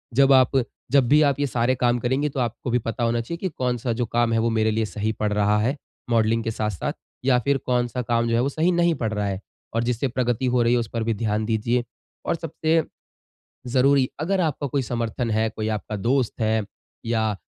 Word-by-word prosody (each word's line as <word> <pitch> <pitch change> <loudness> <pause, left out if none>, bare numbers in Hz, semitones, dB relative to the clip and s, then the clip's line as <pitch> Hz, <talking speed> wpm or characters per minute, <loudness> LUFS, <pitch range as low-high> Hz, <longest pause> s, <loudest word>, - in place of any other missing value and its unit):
जब 135 +1 +6
आप 130 0 +4 0.3
जब 135 -3 +4
भी 150 +4 +5
आप 140 -2 +2
ये 145 - +1
सारे 125 +1 +1
काम 120 -1 +1
करेंगे 130 +5 0
तो 135 - -5
आपको 120 +1 -2
भी 125 - +2
पता 115 +1 -3
होना 115 0 +1
चाहिए 170 +9 -5
कि 190 +1 -2
कौन-सा 125 -4 -2
जो 120 +1 -1
काम 120 +1 +1
है 115 - +2
वो 115 +1 +1
मेरे 110 -1 +1
लिए 110 0 0
सही 105 +1 -2
पड़ 105 -1 -2
रहा 105 0 +2
है, 125 +7 +1 0.3
मॉडलिंग 115 0 +2
के 115 - -2
साथ-साथ 105 -5 -2 0.3
या 130 -2 +4
फिर 140 +3 +1
कौन-सा 125 0 0
काम 115 -1 0
जो 115 - +2
है 120 - +3
वो 135 - +1
सही 160 +5 +1
नहीं 170 -1 +2
पड़ 110 -2 0
रहा 105 -1 -1
है, 95 -1 -2 0.3
और 115 - +1
जिससे 120 +2 0
प्रगति 125 0 -1
हो 120 - +4
रही 120 +1 +3
है 125 - +3
उस 115 - -3
पर 115 -1 -1
भी 115 0 0
ध्यान 110 0 -1
दीजिये। 115 +2 0 0.4
और - - +1
सबसे 160 0 0 0.9
ज़रूरी 135 0 +4
अगर 185 +5 0
आपका 150 -3 -1
कोई 140 +1 0
समर्थन 120 -1 -2
है, 110 +1 +1
कोई 110 -1 -4
आपका 110 0 -3
दोस्त 120 +5 0
है 110 0 +1 0.4
या 110 -2 +1
120 Hz, 225 wpm, -24 LUFS, 110-135 Hz, 0.9 s, जब